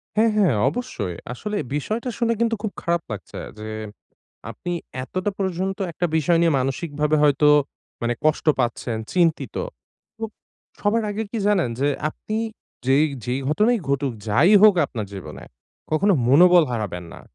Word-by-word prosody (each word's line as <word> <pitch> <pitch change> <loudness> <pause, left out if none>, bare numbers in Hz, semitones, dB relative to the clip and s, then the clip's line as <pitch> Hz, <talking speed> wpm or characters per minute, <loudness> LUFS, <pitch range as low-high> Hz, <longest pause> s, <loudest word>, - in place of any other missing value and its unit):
হ্যাঁ, 225 +1 +4
হ্যাঁ 180 - +4
অবশ্যই। 110 - -4 0.2
আসলে 210 - -4 0.2
বিষয়টা 220 - -2
শুনে 230 -1 +2
কিন্তু 230 -1 +2
খুব 215 - -2
খারাপ 170 -1 0
লাগছে 105 - -7 0.2
যে 110 - -6 0.8
আপনি 175 - -5 0.3
এতটা 185 +8 -2
পর্যন্ত 190 0 -2
একটা 175 +3 -1
বিষয় 165 +2 +3
নিয়ে 165 - +4
মানসিকভাবে 150 +3 0
হয়তো 150 0 +4 0.5
মানে 120 0 +1
কষ্ট 155 +1 +1
পাচ্ছেন, 120 -1 -1 0.2
চিন্তিত। 170 -3 +1 0.6
তো - - -13 0.6
সবার 220 +2 +1
আগে 210 +2 -2
কি 230 - -3
জানেন? 190 -11 +2
যে 140 - +2 0.2
আপনি 215 +7 -6 0.5
যেই 135 +4 +4 0.2
যেই 125 +2 -1
ঘটনাই 215 +10 +3
ঘটুক, 140 -2 0 0.2
যাই 145 - +4
হোক 210 -3 +8
আপনার 110 -6 -5
জীবনে 95 - -8 0.5
কখনো 195 +6 +3 0.2
মনোবল 175 +5 +7
হারাবেন 100 -6 -3
না। - - -11
165 Hz, 145 wpm, -23 LUFS, 135-205 Hz, 0.8 s, হোক